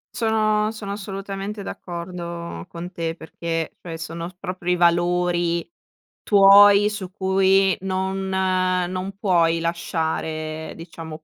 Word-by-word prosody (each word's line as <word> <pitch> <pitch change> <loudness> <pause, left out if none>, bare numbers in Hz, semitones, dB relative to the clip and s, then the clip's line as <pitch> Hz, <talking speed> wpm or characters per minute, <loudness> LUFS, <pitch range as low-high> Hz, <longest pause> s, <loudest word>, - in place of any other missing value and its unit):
Sono 215 -1 +1
sono 205 -2 -6
assolutamente 195 0 -5
d'accordo 170 -2 -6
con 175 +1 -7
te 165 -2 -3
perché, 165 0 -4
cioè 165 -2 -6
sono 165 +1 -6
proprio 185 -1 -3
i - - +2
valori 175 0 +2 0.5
tuoi 200 0 +7
su 195 -3 -6
cui 190 0 +3
non 190 0 -2
non 185 0 0
puoi 170 -4 +2
lasciare 160 -2 -3
diciamo 165 -2 -9
180 Hz, 105 wpm, -23 LUFS, 170-195 Hz, 0.5 s, tuoi